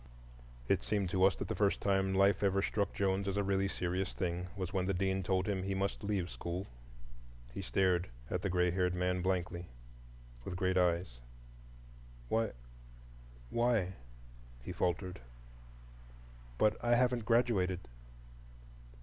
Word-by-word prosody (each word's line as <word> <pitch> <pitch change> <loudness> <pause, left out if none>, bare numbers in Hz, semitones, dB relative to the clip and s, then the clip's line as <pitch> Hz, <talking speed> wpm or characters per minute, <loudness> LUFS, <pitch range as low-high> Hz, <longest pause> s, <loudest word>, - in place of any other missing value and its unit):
It - - +3
seemed 100 -4 -1
to 95 0 +2
us 95 - +4
that - - -4
the - - -1
first 100 -2 +2
time 95 -1 +1
life 100 +1 +4
ever 100 -1 +2
struck 100 -1 0
Jones 100 0 0
as 100 0 -1
a 100 - +2
really 100 0 +1
serious 95 0 -2
thing 90 -1 -2
was 95 -1 -3
when 95 -2 0
the 95 - +1
Dean 95 +1 +1
told 95 0 0
him 100 -2 0
he 95 +1 -2
must 100 +2 -2
leave 100 -4 0
school. 90 +2 -4 0.9
He - - -4
stared 95 -2 +1 0.2
at - - -2
the 100 - -1
gray 90 0 +2
haired 90 0 +1
man 90 0 0
blankly, 90 -2 -1 0.8
with 90 - -5
great 95 0 +1
eyes. 85 -8 +1 1.1
"Why,—why," - - -3 0.7
he - - -5
faltered, 90 -1 -1 1.4
"but—I 115 - +3
haven't 125 -1 +2
graduated!" 105 -6 +2
95 Hz, 140 wpm, -34 LUFS, 90-100 Hz, 1.4 s, us